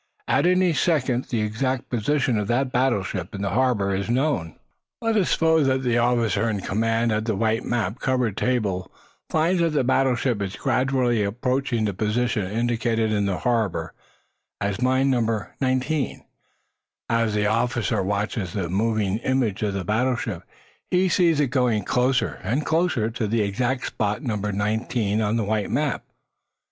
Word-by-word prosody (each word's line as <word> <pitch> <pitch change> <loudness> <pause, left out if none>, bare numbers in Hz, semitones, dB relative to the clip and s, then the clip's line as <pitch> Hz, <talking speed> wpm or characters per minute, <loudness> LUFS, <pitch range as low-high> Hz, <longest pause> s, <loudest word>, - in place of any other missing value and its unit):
At - - +3
any 180 -1 +3
second 130 -7 +1
the 115 -3 -2
exact 125 +4 -2
position 125 +2 +1
of 105 - -2
that 130 +3 0
battleship 120 -5 -1
in 100 - -4
the 100 - -1
harbor 110 -4 +1
is 100 +3 -2
known. 125 - 0 0.4
Let 225 -1 0
us 200 -5 +2
suppose 160 -3 +3
that 130 0 +1
the 120 -1 +2
officer 115 -3 +1
in 100 -3 -2
command 115 +4 0
at 110 0 0
the 110 -3 0
white, 110 +3 0
map 120 -1 -1
covered 125 -6 0
table 105 -8 -1 0.4
finds 170 +3 +2
that 165 -2 +1
the 145 - +2
battleship 125 -3 +1
is 100 0 -3
gradually 125 -3 +1
approaching 125 +2 -1
the 100 - -1
position 110 0 -1
indicated 115 0 0
in 105 -1 +1
the 95 -2 -1
harbor 115 -7 -1 0.7
as 100 +2 -2
mine 130 +2 +2
number 115 -4 -1
nineteen; 130 +3 -1 0.8
as 115 -2 +1
the 105 0 +1
officer 115 -1 0
watches 100 -1 -2
the 95 -5 -2
moving 105 +1 0
image 125 -5 0
of 105 -2 -1
the 95 -2 -3
battleship, 115 -3 -1 0.5
he 185 +1 +2
sees 170 -3 +3
it 145 -4 +2
going 120 -6 +1
closer 125 +4 +1
and 125 +10 -1
closer 160 -9 +1
to 115 -2 -2
the 110 +1 +1
exact 120 +6 -1
spot 105 +6 -2
numbered 105 -5 -2
nineteen 105 +1 0
or 105 -1 0
the 115 0 +1
white 105 0 -1
map. - - -1
115 Hz, 160 wpm, -24 LUFS, 105-130 Hz, 0.8 s, At